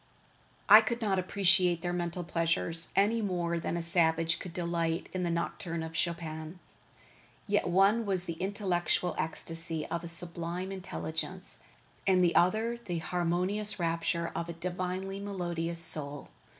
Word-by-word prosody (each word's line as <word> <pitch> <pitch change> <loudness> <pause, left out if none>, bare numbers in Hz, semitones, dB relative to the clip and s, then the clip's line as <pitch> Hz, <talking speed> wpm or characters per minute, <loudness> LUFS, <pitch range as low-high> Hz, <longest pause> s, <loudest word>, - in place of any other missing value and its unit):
I 215 +2 +11
could 235 +2 -2
not 200 -5 +1
appreciate 185 -2 +2
their 175 0 -1
mental 175 0 -2
pleasures, 165 0 0
any 215 +4 +3
more 175 -4 -1
than 170 - -2
a 170 - -2
savage 165 -1 +2
could 180 - -7
delight 170 -1 -1
in 185 -1 -1
a - - 0
nocturne 170 0 -2
of 160 0 -7
Chopin. 165 -1 -3 0.9
Yet 205 -3 +1
one 195 +6 +4
was 185 -2 0
the 170 - -3
intellectual 180 -3 0
ecstasy 165 -1 -3
of 170 0 -3
a - - -4
sublime 170 +2 0
intelligence, 185 -1 -4 0.5
and 185 -1 +5
the 175 - +4
other 220 +6 +3
the 175 -5 -3
harmonious 180 +6 0
rapture 170 0 0
of 170 0 -3
a - - -3
divinely 185 +3 -3
melodious 175 -4 -3
soul. 145 -4 0
175 Hz, 145 wpm, -31 LUFS, 165-190 Hz, 0.9 s, I